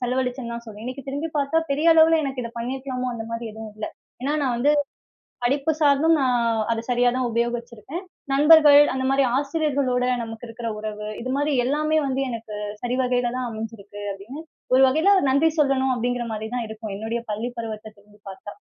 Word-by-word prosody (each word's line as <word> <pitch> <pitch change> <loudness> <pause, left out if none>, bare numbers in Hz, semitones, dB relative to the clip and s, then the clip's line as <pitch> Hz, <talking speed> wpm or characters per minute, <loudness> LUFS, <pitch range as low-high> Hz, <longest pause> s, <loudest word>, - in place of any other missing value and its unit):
செலவழிச்சேன்னு 250 -1 -2
தான் 235 - -6
சொல்லுவேன். 215 -1 -10
இன்னைக்கு 260 +3 -7
திரும்பி 285 +4 -3
பார்த்தா, 285 +3 +1
பெரிய 295 +4 +1
அளவில 325 0 +6
எனக்கு 265 -2 -3
இதை 235 - -6
பண்ணியிருக்கலாமோ? 255 +1 -3
அந்த 225 -1 -5
மாதிரி 230 0 -4
எதுவும் 220 0 -8
இல்ல. 215 - -4 0.3
ஏன்னா 285 +3 0
நான் 255 -3 +1
வந்து 280 +5 +3 0.7
படிப்பு 275 +5 +1
சார்ந்தும், 295 +2 +4
நான் 255 -2 +2 0.3
அத 225 0 -2
சரியா 245 0 +3
தான் 255 -1 0
உபயோகிச்சுருக்கேன். 235 - -3 0.3
நண்பர்கள், 295 0 +8
அந்த 260 0 -1
மாரி 270 0 +3
ஆசிரியர்களோட 280 -3 0 0.2
நமக்கு 225 +1 -7
இருக்கிற 230 0 -5
உறவு 210 0 -5
இது 255 +2 -3
மாதிரி 290 0 +1
எல்லாமே 305 +4 +1
வந்து 270 0 -1
எனக்கு 225 -2 -6 0.3
சரி 245 +1 -1
வகையில 245 -1 0
தான் 250 -1 -2
அமைஞ்சுருக்கு, 220 -2 -8
அப்படீன்னு 225 +11 -9 0.3
ஒரு 265 +1 +7
வகையில 335 +9 +4
நன்றி 290 +5 +4
சொல்லணும் 265 -3 +2
அப்டீங்கிற 245 0 -1
மாரி 215 0 -4
தான் 240 -2 -2
இருக்கும். 215 -2 -6
என்னுடைய 225 +2 -3
பள்ளி 225 +4 -3
பருவத்தை 220 -1 -5
திரும்பி 205 +1 -23
பார்த்தா. 205 +2 -10
250 Hz, 175 wpm, -23 LUFS, 230-275 Hz, 0.7 s, நண்பர்கள்